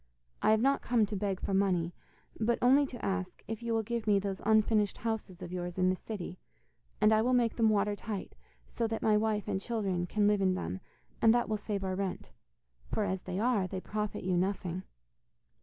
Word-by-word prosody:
I - - +3
have 220 0 +4
not 275 +1 +3
come 235 -3 +2
to 205 - -5
beg 195 -1 -1
for - - -3
money, 180 -3 +2 0.5
but 230 +2 +2
only 275 +3 +5
to 245 - -7
ask 190 -1 -3
if 225 0 -4
you 235 -1 -1
will 225 - +1
give 235 0 -3
me 205 -1 +5
those 195 -1 -3
unfinished 215 -1 +3
houses 215 -5 -4
of 175 - -7
yours 175 0 -4
in 185 0 +3
the - - 0
city, 185 -3 -7 0.6
and 215 +1 +5
I 215 - +4
will 250 +3 +2
make 235 -2 +2
them 225 -2 +4
watertight, 205 0 -1 0.3
so 230 - -2
that 225 0 -3
my 215 -1 +4
wife 210 -1 0
and 190 - -1
children 195 -6 -1
can 210 +3 +1
live 205 -1 +3
in 185 -1 +3
them, 90 - -4 0.4
and 225 +1 +6
that 240 - +1
will 215 - 0
save 205 -1 -3
our 190 -1 -1
rent. 190 0 -3 0.6
For 215 - +1
as 190 -2 -1
they 185 0 -5
are, 215 -3 +2
they 185 0 -4
profit 210 +2 -3
you 185 0 +1
nothing. 185 -1 -1
205 Hz, 210 wpm, -31 LUFS, 185-220 Hz, 0.6 s, and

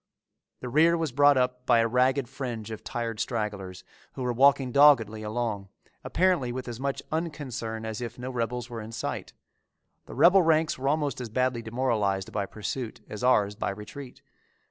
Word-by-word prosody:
The 125 - -5
rear 165 +6 +4
was 160 -4 -2
brought 145 +2 +5
up 125 0 -1
by 120 - +5
a 115 0 +3
ragged 125 +2 +2
fringe 120 -5 -6
of 110 - -7
tired 115 -2 -4
stragglers 105 -5 -3 0.3
who 130 - -5
were 125 -1 0
walking 135 +1 +4
doggedly 120 -7 +5
along, 105 -3 -3 0.3
apparently 180 -9 +1
with 130 +1 -5
as 120 -1 -6
much 140 0 -3
unconcern 130 -9 -4
as 110 +1 -5
if 120 - -6
no 125 +1 -5
rebels 120 0 -3
were 120 -3 -6
in 110 +1 -9
sight. - - -4 0.7
The - - -9
rebel 185 +3 +6
ranks 160 -2 +2
were 135 +1 0
almost 145 -4 -1
as 120 - -5
badly 125 +1 0
demoralized 110 -5 -1
by 100 -2 -2
pursuit 110 +4 -5
as 105 +3 -7
ours 105 -5 +3
by 105 - -3
retreat. 105 +7 -9
125 Hz, 175 wpm, -27 LUFS, 110-135 Hz, 0.7 s, rebel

